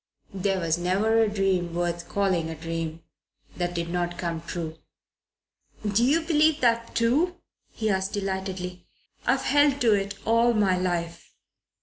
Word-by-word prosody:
"There 195 Hz, 0 st, 0 dB
was 165 Hz, -1 st, 0 dB
never 205 Hz, +6 st, +2 dB
a 220 Hz, -, +3 dB
dream 190 Hz, -4 st, 0 dB
worth 175 Hz, 0 st, -2 dB
calling 185 Hz, -5 st, 0 dB
a 160 Hz, -, -5 dB
dream 165 Hz, 0 st, -5 dB, 0.5 s
that 175 Hz, 0 st, -2 dB
did 170 Hz, 0 st, -2 dB
not 175 Hz, 0 st, -2 dB
come 170 Hz, -2 st, -3 dB
true." 165 Hz, -1 st, -5 dB, 1.1 s
"Do 210 Hz, +3 st, +2 dB
you 295 Hz, +7 st, +3 dB
believe 315 Hz, -1 st, +3 dB
that, 230 Hz, -1 st, +1 dB
too?" 290 Hz, +10 st, +2 dB, 0.4 s
he 220 Hz, -, -3 dB
asked 190 Hz, 0 st, -1 dB
delightedly. 190 Hz, -2 st, -4 dB, 0.4 s
"I've 265 Hz, 0 st, +2 dB
held 290 Hz, 0 st, +3 dB
to 230 Hz, -3 st, +5 dB
it 200 Hz, 0 st, -1 dB
all 230 Hz, +1 st, +3 dB
my 200 Hz, -3 st, +3 dB
life." 175 Hz, -2 st, -3 dB
190 Hz, 145 wpm, -26 LUFS, 175-230 Hz, 1.1 s, to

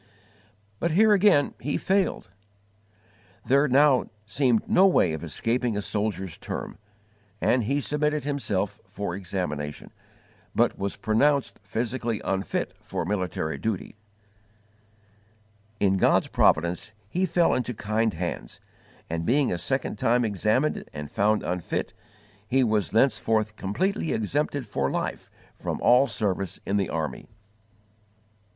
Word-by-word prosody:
But 170 Hz, -, +1 dB
here 210 Hz, +6 st, +5 dB
again 195 Hz, -7 st, +4 dB
he 145 Hz, -, -2 dB
failed. 190 Hz, -, 0 dB, 1.1 s
There 140 Hz, +3 st, +4 dB
now 135 Hz, 0 st, +4 dB, 0.2 s
seemed 120 Hz, +1 st, +1 dB
no 190 Hz, +2 st, +5 dB
way 90 Hz, -, +3 dB
of 80 Hz, -, -5 dB
escaping 115 Hz, -, -1 dB
a -, -, -1 dB
soldier's 100 Hz, -3 st, -2 dB
term, -, -, -6 dB, 0.6 s
and 125 Hz, -3 st, +2 dB
he 140 Hz, +5 st, 0 dB
submitted 150 Hz, 0 st, 0 dB
himself 105 Hz, -8 st, -2 dB
for 100 Hz, -2 st, -4 dB
examination, 90 Hz, -6 st, -4 dB, 0.6 s
but -, -, +3 dB
was 100 Hz, 0 st, -3 dB
pronounced 140 Hz, +5 st, +1 dB
physically 115 Hz, +2 st, -2 dB
unfit 95 Hz, 0 st, -2 dB
for -, -, -4 dB
military 90 Hz, -5 st, -2 dB
duty. 110 Hz, -2 st, -3 dB, 1.8 s
In 95 Hz, -1 st, +3 dB
God's -, -, +3 dB
providence 85 Hz, +6 st, +2 dB
he 180 Hz, -, 0 dB
fell 170 Hz, 0 st, +3 dB
into 125 Hz, -1 st, -1 dB
kind 110 Hz, 0 st, 0 dB
hands, 85 Hz, -8 st, -5 dB, 0.5 s
and, 85 Hz, 0 st, -3 dB
being 135 Hz, -, +2 dB
a 85 Hz, -, -2 dB
second 130 Hz, +11 st, -2 dB
time 120 Hz, -1 st, +2 dB
examined 110 Hz, +7 st, 0 dB
and 75 Hz, -1 st, -7 dB
found 105 Hz, +1 st, +2 dB
unfit, 90 Hz, -1 st, -3 dB, 0.5 s
he 130 Hz, +4 st, +3 dB
was 110 Hz, -4 st, +1 dB
thenceforth 110 Hz, -3 st, +2 dB
_completely 165 Hz, -, -1 dB
exempted 140 Hz, +5 st, -1 dB
for 70 Hz, -9 st, -1 dB
life -, -, -3 dB, 0.2 s
from -, -, -4 dB
all 125 Hz, +3 st, +5 dB
service 100 Hz, -6 st, -2 dB
in 100 Hz, -, 0 dB
the 100 Hz, -3 st, 0 dB
army. 80 Hz, -2 st, -4 dB
110 Hz, 125 wpm, -26 LUFS, 95-140 Hz, 1.8 s, here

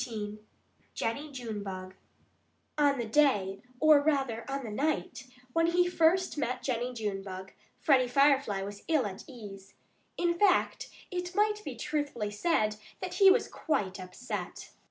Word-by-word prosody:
XIV 215 Hz, -3 st, -5 dB, 0.6 s
JENNIE 285 Hz, +7 st, -2 dB
JUNEBUG 200 Hz, -7 st, -6 dB, 0.8 s
On 285 Hz, -2 st, +3 dB
the 240 Hz, -, -2 dB
day 215 Hz, -7 st, +2 dB, 0.2 s
or 310 Hz, -2 st, +7 dB
rather, 270 Hz, -6 st, 0 dB
on 275 Hz, 0 st, -3 dB
the 225 Hz, -, -6 dB
night 285 Hz, +3 st, -2 dB, 0.3 s
when 330 Hz, 0 st, +3 dB
he 355 Hz, +1 st, +3 dB
first 355 Hz, 0 st, +2 dB
met 255 Hz, -3 st, -2 dB
Jennie 245 Hz, -1 st, -1 dB
Junebug, 195 Hz, -4 st, -5 dB, 0.3 s
Freddie 265 Hz, -5 st, +4 dB
Firefly 270 Hz, -6 st, +3 dB
was 200 Hz, +1 st, -7 dB
ill 310 Hz, -7 st, +2 dB
at 195 Hz, -2 st, -6 dB
ease. 200 Hz, -6 st, -11 dB, 0.4 s
In 345 Hz, -1 st, +2 dB
fact 395 Hz, -3 st, +2 dB, 0.2 s
it 360 Hz, 0 st, -4 dB
might 420 Hz, 0 st, +2 dB
be -, -, -6 dB
truthfully 285 Hz, -9 st, -2 dB
said 215 Hz, -3 st, +1 dB, 0.2 s
that -, -, -5 dB
he 390 Hz, -2 st, +7 dB
was 430 Hz, +5 st, +4 dB
quite 200 Hz, -, -2 dB
upset. 185 Hz, +7 st, -6 dB
255 Hz, 140 wpm, -30 LUFS, 210-310 Hz, 0.8 s, or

